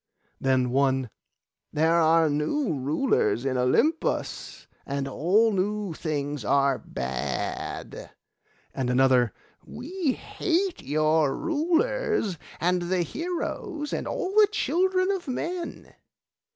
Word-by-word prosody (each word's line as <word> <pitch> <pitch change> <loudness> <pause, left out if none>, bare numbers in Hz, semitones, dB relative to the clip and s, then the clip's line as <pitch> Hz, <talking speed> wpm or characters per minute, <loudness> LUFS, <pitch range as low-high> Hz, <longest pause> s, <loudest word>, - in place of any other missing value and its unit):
Then 130 -2 +1
one, 130 -2 +1 0.6
'There 160 +2 +2
are 165 0 +4
new 160 - 0
rulers 140 - +1
in 130 -1 0
Olympus, 230 - 0 0.2
and 140 0 -3
all 190 - +3
new 205 -1 -1
things 145 -4 -3
are 140 +4 +2
bad.' 65 +2 -4 0.6
And 130 -2 -2
another, 125 -2 +4 0.3
'We 300 +4 -3
hate 365 +1 -1
your 155 0 +2
rulers, 335 - 0 0.2
and 180 +1 +1
the 175 0 0
heroes, 330 - -4
and - - -2
all 480 -7 -2
the 420 +1 +6
children 370 +1 +1
of 380 -5 -3
men. 340 +7 -4
175 Hz, 105 wpm, -26 LUFS, -, 0.6 s, the